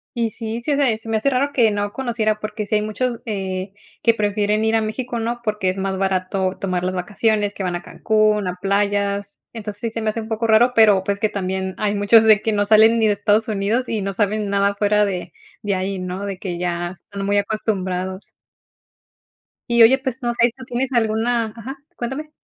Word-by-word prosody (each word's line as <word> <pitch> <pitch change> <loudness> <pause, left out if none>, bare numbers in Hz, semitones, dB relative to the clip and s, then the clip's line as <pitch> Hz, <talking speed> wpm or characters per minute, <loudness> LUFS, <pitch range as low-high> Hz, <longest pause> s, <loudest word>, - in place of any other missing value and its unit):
Y 230 -1 0
sí, 225 +1 -5
se 285 +4 0
me 275 -5 +2
se 225 - -7
me 220 - +1
hace 275 +6 +1
raro 275 +2 +1
que 230 -4 +4
no 205 0 -2
conociera, 225 -4 -1
porque, 215 0 -5
si 215 - 0
hay 210 - +1
muchos, 235 +3 -2
eh, 190 -3 -4 0.3
que 230 - +5
prefieren 210 0 0
ir 220 0 +2
a 225 - +3
México, 235 +3 -3
¿no? 235 +1 -3
Porque, 210 -4 0
es 185 +1 -3
más 190 0 -2
barato 190 0 -1
tomar 185 -2 -2
las 185 +1 -1
vacaciones, 205 +2 0
que 195 - -4
van 180 -1 -1
a 175 - -4
Cancún, 215 0 +1
a 180 - -3
playas. 200 0 -1
Entonces, 210 -3 -6
sí 230 - -1
se 225 0 -5
me 220 - +1
hace 230 - -4
un 220 - -8
poco 225 0 -2
raro, 225 +3 +4
pero, 210 -4 +5
pues, 200 +1 -2
que 215 - +1
también 190 -1 -3
hay 210 -1 0
muchos 205 +2 +5
de 215 -2 +6
que 220 - +1
no 205 0 +2
salen 220 +2 +5
ni 220 - +3
de 210 - +3
Estados 205 +2 +1
Unidos 215 +4 -1
y 220 -2 -1
no 195 0 -3
saben 210 +1 0
nada 200 0 +2
fuera 210 +1 +2
de 180 -3 -4 0.3
de 205 -1 0
ahí, 190 +1 -2
¿no?, 185 +2 -4
de 195 -2 -4
que 180 -2 -5
ya 175 -1 -2
están 195 +2 -8
muy 200 +1 +2
acostumbrados. 190 -3 -2 1.4
Y 235 0 +4
oye, 235 +4 +7
pues, 265 -1 -4
no 240 -1 -1
sé, 235 0 +3
¿tú 260 - -10
tienes 250 +2 -2
alguna? 225 -1 0
Ajá, 255 +4 -7 0.2
cuéntame. 265 +6 -5
210 Hz, 220 wpm, -21 LUFS, 195-230 Hz, 1.4 s, oye